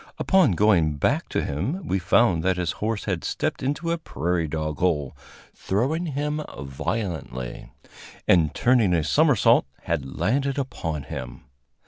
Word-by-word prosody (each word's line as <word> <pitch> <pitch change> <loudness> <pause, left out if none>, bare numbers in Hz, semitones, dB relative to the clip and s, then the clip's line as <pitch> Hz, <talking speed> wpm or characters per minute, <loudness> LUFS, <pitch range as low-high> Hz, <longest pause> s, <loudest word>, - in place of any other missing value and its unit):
Upon 185 - +4
going 85 -6 +3
back 70 - 0
to - - -1
him, 130 - -3
we 95 - +1
found 90 -1 +3
that 95 +1 +1
his 90 -3 0
horse 110 0 -1
had 95 -5 -2
stepped - - -2
into 145 +5 -1
a 170 - -1
prairie 85 - -2
dog 75 -1 -3
hole, 75 -7 0 0.4
throwing 140 - -1
him 150 +1 -2 0.2
violently, 70 - -4 0.6
and, 80 -5 +4
turning 115 -8 +3
a 80 - +1
somersault, 70 -3 +4 0.2
had 65 - -3
landed 135 +3 0
upon 90 - -3
him. 65 -1 -7
90 Hz, 140 wpm, -24 LUFS, 80-130 Hz, 0.6 s, Upon